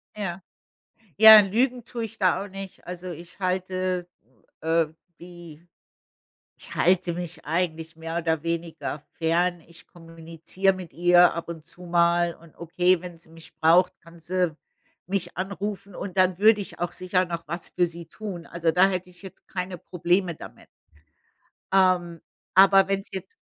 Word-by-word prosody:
Ja. 190 -3 -4 0.8
Ja, 220 +2 +11
lügen 240 +5 0
tue 235 0 -5
ich 225 0 -9
da 185 0 +2
auch 205 - -8
nicht. 195 0 -9
Also, 180 0 -7
ich 170 +2 -12
halte, 185 -1 -2 0.5
äh, 165 0 +2 0.3
die 175 -2 -13 0.9
ich - - -10
halte 180 -1 +2
mich 175 0 -7
eigentlich 160 -1 -2
mehr 165 +1 -4
oder 160 -1 -1
weniger 165 -3 -4 0.2
fern. 170 +2 +1
Ich 170 0 -16
kommuniziere 165 +2 -3
mit 185 -3 -9
ihr 175 +1 +5
ab 170 0 -6
und 160 -2 -8
zu 180 - -15
mal 170 0 +2
und 165 -2 -20
okay, 180 +1 +1
wenn 175 -2 -9
sie 160 - -19
mich 165 -1 -14
braucht, 175 +3 +4
kann 170 0 -17
sie 180 -1 -1 0.5
mich 195 -2 -3
anrufen 200 +1 -5
und 190 -2 -6
dann 185 -1 +3
würde 215 +1 +5
ich 195 - -8
auch 175 0 -3
sicher 185 0 0
noch 170 -3 -6
was 170 +1 -5
für 175 - +1
sie 170 0 -9
tun. 185 -3 -8
Also, 170 -1 -1
da 180 +4 +4
hätte 185 -1 -4
ich 175 +2 -10
jetzt 190 - -13
keine 180 -1 -5
Probleme 175 +1 0
damit. - - -13 1.1
Ähm, 180 -3 +2 0.3
aber 195 0 +6
wenn's 195 0 -1
jetzt 190 0 -7
175 Hz, 160 wpm, -25 LUFS, 170-185 Hz, 1.1 s, Ja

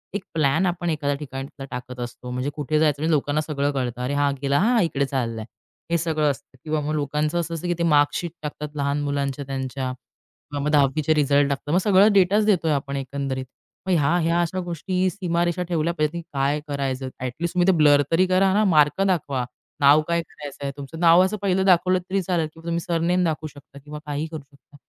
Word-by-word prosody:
एक 205 - -3
प्लॅन 155 +3 +2
आपण 175 -1 -1
एखाद्या 145 -3 -1
ठिकाणीतला 135 -1 -7
टाकत 125 0 -7
असतो. 120 +1 -7
म्हणजे 125 +3 -2
कुठे 150 +1 0
जायचं 150 -2 +2
म्हणजे 160 +1 +1
लोकांना 145 +1 +1
सगळं 145 -2 -1
कळतं. 125 -3 -3
अरे 125 +3 -2
हा 145 0 +2
गेला 140 0 +2
हां 230 +4 +3
इकडे 140 -4 0
चाललाय. 115 -5 -3 0.5
हे 170 - +3
सगळं 155 -3 +1
असतं 130 -1 -11
किंवा 155 -1 -1
मग 150 +1 -2
लोकांचं 150 +3 -1
असं 170 0 -3
असतं, 165 +2 -4
की 175 - +1
ते - - +1
मार्कशीट 155 +2 +2
टाकतात 150 0 -6
लहान 140 0 -1
मुलांच्या 140 -1 -2
त्यांच्या. 130 -1 -3 0.6
मग 145 +1 -1
दहावीचे 150 +1 +3
रिझल्ट 145 -1 +3
टाकतात. 140 +1 -3
मग - - +4
सगळा 195 +1 +5
डेटाच 200 +2 +4
देतोय 180 -7 +2
आपण 140 -1 -2
एकंदरीत. 135 -1 -4 0.4
मग - - +1
ह्या 145 0 +2
ह्या 165 +1 +1
अशा 175 +2 -2
गोष्टी 180 +2 -1
सीमारेषा 175 -2 -1
ठेवल्या 170 0 0
पाहिजेत 155 -2 -1
ना 170 - -4
की - - -8
काय 140 +2 +1
करायचं 135 -2 -3
ॲट 130 -1 -2
लिस्ट 170 -1 -1
तुम्ही 175 0 +3
ते - - +7
ब्लर 145 -2 +6
तरी 175 +3 +4
करा 185 +1 +3
ना 210 +2 +3
मार्क 155 -1 +3
दाखवा. 140 -9 0 0.3
नाव 145 +2 +6
काय 170 0 +1
करायचंय! 145 -3 -7
तुमचं 140 +3 -8
नाव 170 +1 +6
असं 195 +3 -1
पहिलं 190 -1 +1
दाखवलं 185 0 +4
तरी 190 +2 -2
चालेल, 170 -3 0
की - - -16
तुम्ही 170 0 -1
सरनेम 175 +1 0
दाखवू 155 -2 -1
शकता 145 -1 -14
किंवा 150 +2 -9
काहीही 150 +1 -3
करू 160 -2 -6
शकता. 140 0 -24
150 Hz, 205 wpm, -23 LUFS, 140-170 Hz, 0.6 s, ते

